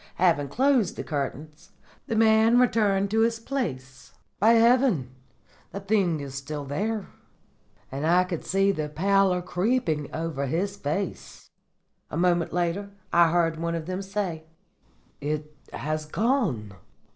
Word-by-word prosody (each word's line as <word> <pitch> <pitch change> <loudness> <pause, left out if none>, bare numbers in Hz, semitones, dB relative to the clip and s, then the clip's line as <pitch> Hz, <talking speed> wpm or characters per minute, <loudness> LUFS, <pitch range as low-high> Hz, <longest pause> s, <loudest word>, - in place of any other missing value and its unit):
Having 165 -6 +2
closed 250 - +2
the - - -5
curtains, 150 +1 -5 0.3
the 225 - -2
man 220 +1 +5
returned 205 -5 +2
to 220 - +2
his 230 0 +2
place. 135 - -5 0.3
"'By 220 +4 +5
heaven!' 240 0 +5
he 135 - -5
cried, 125 -2 -26
'the 200 - -4
thing 190 -6 +1
is 140 -1 -7
still 140 +2 -5
there!' 205 +9 -2 0.9
And 140 +4 -2
I 180 +2 +5
could 180 -3 -5
see 195 +1 +2
the 155 -5 -3
pallor 190 +3 +2
creeping 180 - 0
over 160 -4 -3
his 190 +8 -1
face. 180 +2 -5 0.6
"A - - -4
moment 175 -1 +2
later 175 +3 -1 0.2
I 170 -1 +6
heard 165 -1 +1
one 170 0 -2
of 165 -2 -4
them 185 +2 -3
say, 190 -5 -4 0.7
'It 150 +1 -4 0.2
has 155 +1 -3
gone. 190 - 0
175 Hz, 145 wpm, -26 LUFS, 150-210 Hz, 0.9 s, I